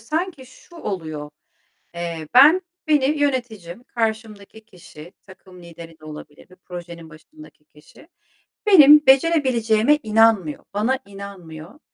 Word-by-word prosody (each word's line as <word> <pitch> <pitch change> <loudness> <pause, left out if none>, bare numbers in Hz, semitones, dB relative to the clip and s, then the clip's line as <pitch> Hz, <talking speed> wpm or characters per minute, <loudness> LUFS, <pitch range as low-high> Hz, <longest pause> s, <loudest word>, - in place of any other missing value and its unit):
sanki 310 +2 -5
şu 340 +6 -19
oluyor. 155 - -6 0.6
Eee, 170 -2 -6
ben 305 +8 +7 0.3
Beni 295 -3 +2
yöneticim, 240 -9 -4
karşımdaki 220 -2 -5
kişi, 175 -4 -15
takım 185 -2 -17
lideri 165 -1 -13
de - - -17
olabilir 150 0 -13
bir 185 - -18
projenin 170 -2 -10
başındaki 280 - -18
kişi. 150 - -21 0.6
Benim 300 -6 +7
becerebileceğime 265 -3 +2
inanmıyor, 215 -7 +1
bana 235 +6 -1
inanmıyor. 195 - -12
210 Hz, 110 wpm, -20 LUFS, 170-265 Hz, 0.6 s, ben